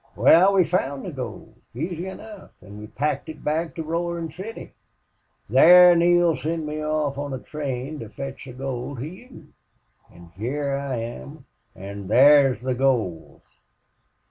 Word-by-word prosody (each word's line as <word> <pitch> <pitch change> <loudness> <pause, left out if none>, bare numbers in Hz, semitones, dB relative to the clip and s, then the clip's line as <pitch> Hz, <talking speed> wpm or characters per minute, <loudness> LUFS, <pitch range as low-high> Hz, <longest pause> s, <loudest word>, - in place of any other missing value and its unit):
Wal, 190 +4 +5
we 190 - +5
found 140 -6 -2
the 185 - -5
gold, 125 -6 -8 0.2
easy 170 +6 -4
enough, 210 +1 -10
an' 100 +3 -11
we 105 - -9
packed 140 +4 -3
it 155 -1 -10
back 160 +2 -2
to 165 - -4
Roarin' 170 0 -3
City. 190 +8 -9 0.7
Thar 175 - +7
Neale 175 -1 +3
sent 160 +1 -3
me 150 0 -4
off 150 -2 -1
on 145 -2 -4
a - - -4
train 140 +1 -5
to 115 - -8
fetch 135 +6 -8
the 130 - -10
gold 130 +1 -5
to 125 - -5
you. 190 - -12 0.6
An' 85 -1 -16
hyar 140 +7 -2
I 140 -2 -3
am 120 +5 -7 0.3
an' 100 +1 -8
thar's 135 +2 +5
the 130 0 -1
gold." 120 -11 -1
145 Hz, 155 wpm, -23 LUFS, 125-165 Hz, 0.7 s, Thar